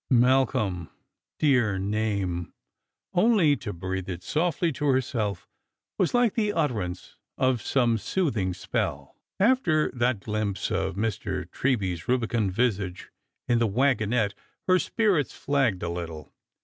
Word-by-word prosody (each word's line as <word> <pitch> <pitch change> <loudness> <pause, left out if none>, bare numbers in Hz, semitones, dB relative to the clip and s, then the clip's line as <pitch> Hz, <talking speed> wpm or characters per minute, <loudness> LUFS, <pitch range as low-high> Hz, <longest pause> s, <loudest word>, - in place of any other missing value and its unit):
Malcolm! 120 -8 +2 0.5
dear 120 -9 +3
name! 100 -3 -1 0.6
Only 180 -7 +4
to 105 - -5
breathe 95 +1 -4
it 90 -1 -5
softly 165 - 0
to 145 +1 -2
herself 120 -8 0 0.5
was 185 - +2
like 245 -3 +3
the 210 -3 0
utterance 105 - -2 0.2
of 130 -3 +2
some 120 -4 +2
soothing 110 - -1
spell. 90 - -3 0.2
After 190 -9 +3
that 120 -4 0
glimpse 105 -2 -2
of - - -1
Mr. 105 -1 -2
Treby's 100 -10 -1
rubicund 115 -5 +1
visage 100 -4 -1 0.4
in 120 -1 +3
the 115 - +3
wagon 115 -1 +1
ette 110 -5 +1 0.3
her 185 0 +4
spirits 195 - +1
flagged 135 -9 +1
a 85 - -1
little. 85 -3 -6
115 Hz, 125 wpm, -26 LUFS, 95-145 Hz, 0.6 s, Only